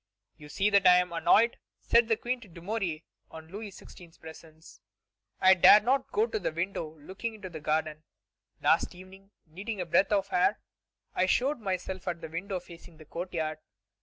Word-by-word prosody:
"You 150 Hz, -1 st, -14 dB
see 200 Hz, +7 st, 0 dB
that 200 Hz, -2 st, +5 dB
I 180 Hz, -, +8 dB
am 180 Hz, -1 st, +1 dB
annoyed," 230 Hz, +7 st, +3 dB, 0.2 s
said 235 Hz, 0 st, +3 dB
the 225 Hz, -1 st, +1 dB
Queen 245 Hz, +2 st, -3 dB
to 220 Hz, -, -13 dB
Dumouriez 175 Hz, -2 st, -4 dB, 0.3 s
in 160 Hz, 0 st, -11 dB
Louis 205 Hz, +3 st, -7 dB
XVI.'s 175 Hz, -3 st, -15 dB
presence; 160 Hz, 0 st, -14 dB, 0.6 s
"I 190 Hz, 0 st, +7 dB
dare 190 Hz, +3 st, +8 dB
not 260 Hz, +4 st, 0 dB
go 430 Hz, +1 st, +2 dB
to 445 Hz, -2 st, -3 dB
the -, -, -2 dB
window 165 Hz, -2 st, -4 dB
looking 190 Hz, +9 st, -6 dB
into 195 Hz, -3 st, -9 dB
the 160 Hz, -, -7 dB
garden. 155 Hz, 0 st, -1 dB, 0.6 s
Last -, -, +2 dB
evening, 190 Hz, +2 st, -15 dB, 0.2 s
needing 195 Hz, +6 st, -6 dB
a 180 Hz, -, -2 dB
breath 190 Hz, +5 st, +2 dB
of 200 Hz, -1 st, +1 dB
air, 180 Hz, +4 st, +2 dB, 0.5 s
I 185 Hz, -, +1 dB
showed 265 Hz, +8 st, +1 dB
myself 190 Hz, -2 st, -4 dB
at 170 Hz, -1 st, -2 dB
the 160 Hz, -, -8 dB
window 185 Hz, +4 st, -4 dB
facing 170 Hz, -2 st, -15 dB
the 155 Hz, -, -14 dB
courtyard. 160 Hz, -2 st, -4 dB
185 Hz, 180 wpm, -29 LUFS, 165-205 Hz, 0.6 s, I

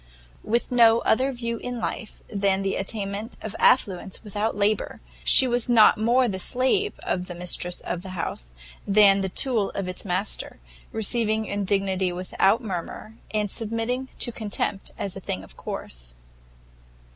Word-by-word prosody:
With 235 Hz, +3 st, -1 dB
no 230 Hz, -2 st, +5 dB
other 260 Hz, +4 st, +2 dB
view 235 Hz, -2 st, -4 dB
in 245 Hz, +1 st, -5 dB
life 225 Hz, -1 st, -5 dB
than 195 Hz, -2 st, 0 dB
the 195 Hz, -, -1 dB
attainment 200 Hz, +2 st, -4 dB
of 215 Hz, -1 st, -7 dB
affluence 190 Hz, -5 st, +2 dB
without 210 Hz, 0 st, -2 dB
labour, 205 Hz, +1 st, 0 dB, 0.2 s
she 265 Hz, -, +7 dB
was 245 Hz, 0 st, 0 dB
not 225 Hz, -3 st, +6 dB
more 240 Hz, +3 st, +3 dB
the 190 Hz, -4 st, -3 dB
slave 265 Hz, -, +1 dB
of 180 Hz, -1 st, -2 dB
the 175 Hz, -, -7 dB
mistress 175 Hz, 0 st, -1 dB
of 175 Hz, -, -4 dB
the 185 Hz, -1 st, -8 dB
house, -, -, -4 dB, 0.4 s
than 200 Hz, -1 st, +5 dB
the 190 Hz, -, -2 dB
tool 225 Hz, -1 st, +1 dB
of 195 Hz, -2 st, -3 dB
its 185 Hz, -, -5 dB
master; 195 Hz, +2 st, -3 dB, 0.3 s
receiving 220 Hz, 0 st, +1 dB
indignity 195 Hz, -2 st, 0 dB
without 185 Hz, +5 st, +1 dB
murmur, 195 Hz, +2 st, -6 dB, 0.2 s
and 210 Hz, -2 st, -1 dB
submitting 230 Hz, +4 st, -2 dB
to 240 Hz, -, +1 dB
contempt 205 Hz, -3 st, -2 dB
as 195 Hz, -, -4 dB
a -, -, -6 dB
thing 95 Hz, -, -4 dB
of 95 Hz, -, -15 dB
course. -, -, -7 dB
205 Hz, 155 wpm, -25 LUFS, 190-230 Hz, 0.4 s, she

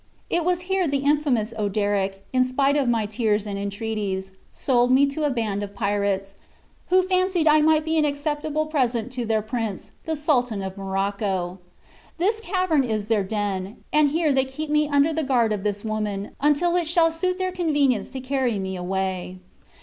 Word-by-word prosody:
It 345 Hz, -, +1 dB
was 360 Hz, +1 st, +1 dB
here 375 Hz, -1 st, 0 dB
the 280 Hz, -1 st, -1 dB
infamous 280 Hz, -7 st, +1 dB
Oderic, 200 Hz, -1 st, -1 dB
in 255 Hz, 0 st, +4 dB
spite 275 Hz, +2 st, +1 dB
of 275 Hz, -4 st, +2 dB
my 225 Hz, -2 st, +1 dB
tears 210 Hz, -1 st, 0 dB
and 200 Hz, -1 st, -4 dB
entreaties, 200 Hz, -2 st, -3 dB, 0.2 s
sold 245 Hz, -2 st, +1 dB
me 270 Hz, +2 st, +6 dB
to 280 Hz, +2 st, -2 dB
a -, -, +2 dB
band 220 Hz, -6 st, -1 dB
of 205 Hz, 0 st, -6 dB
pirates, 200 Hz, -2 st, -1 dB, 0.5 s
who 370 Hz, +1 st, +4 dB
fancied 370 Hz, -2 st, +1 dB
I 305 Hz, 0 st, +6 dB
might 310 Hz, 0 st, +3 dB
be 320 Hz, 0 st, +1 dB
an 305 Hz, -, +3 dB
acceptable 295 Hz, +1 st, -1 dB
present 250 Hz, -6 st, -1 dB
to 250 Hz, -2 st, -3 dB
their 220 Hz, -1 st, +1 dB
prince, 220 Hz, -3 st, -4 dB
the 320 Hz, -, -1 dB
Sultan 250 Hz, -9 st, 0 dB
of 190 Hz, 0 st, -5 dB
Morocco. 195 Hz, -2 st, -2 dB, 0.6 s
This 415 Hz, +6 st, +1 dB
cavern 365 Hz, -8 st, +1 dB
is 215 Hz, -3 st, -2 dB
their 215 Hz, -3 st, +2 dB
den, 200 Hz, -1 st, -3 dB
and 300 Hz, -1 st, +5 dB
here 310 Hz, 0 st, +1 dB
they 265 Hz, 0 st, +3 dB
keep 295 Hz, +3 st, -6 dB
me 300 Hz, -1 st, +2 dB
under 285 Hz, +2 st, +3 dB
the 320 Hz, -, 0 dB
guard 245 Hz, -6 st, +2 dB
of 205 Hz, -, -3 dB
this 205 Hz, 0 st, -2 dB
woman, 210 Hz, -2 st, -3 dB
until 300 Hz, +4 st, +3 dB
it 350 Hz, -3 st, +1 dB
shall 330 Hz, 0 st, +3 dB
suit 365 Hz, +3 st, -1 dB
their 370 Hz, -1 st, -1 dB
convenience 290 Hz, -, +1 dB
to 265 Hz, -, -6 dB
carry 255 Hz, -4 st, 0 dB
me 190 Hz, -1 st, -3 dB
away." 185 Hz, 0 st, -3 dB
255 Hz, 185 wpm, -24 LUFS, 205-305 Hz, 0.6 s, me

